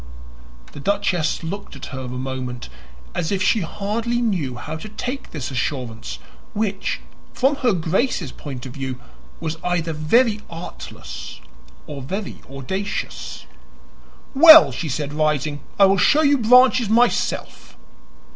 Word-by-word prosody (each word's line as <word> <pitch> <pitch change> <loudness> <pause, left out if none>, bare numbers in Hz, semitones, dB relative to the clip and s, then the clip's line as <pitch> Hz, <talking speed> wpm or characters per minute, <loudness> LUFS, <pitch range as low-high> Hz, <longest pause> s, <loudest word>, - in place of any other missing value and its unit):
The - - -10
duchess 190 -2 0
looked 195 +1 -6
at 135 - -8
her 130 - -4
a - - -5
moment, 125 - -5 0.4
as 160 - -2
if 190 -2 0
she 220 - +3
hardly 220 +7 -2
knew 180 - -1
how 135 +6 -6
to 215 +7 -9
take 250 +6 -5
this 145 -4 -5
assurance, 120 - -3 0.4
which, 205 -2 -1 0.3
from 275 +2 +2
her 250 -4 +2
Grace's 180 - 0
point 135 -4 -8
of 130 - -7
view, 130 -3 -5 0.4
was 160 0 -3
either 170 -2 -1
very 215 +9 +3
artless 170 +1 -8 0.5
or 140 -2 -7
very 190 +10 -5
audacious. 190 +10 -5 0.9
"Well," 315 +3 +10
she 160 - -4
said, 145 +2 -3
rising, 150 -1 0 0.2
"I 200 - +7
will 195 0 +3
show 300 +10 +4
you 285 -2 +4
Branches 250 0 +5
myself." 240 +2 0
175 Hz, 135 wpm, -21 LUFS, 140-220 Hz, 0.9 s, Well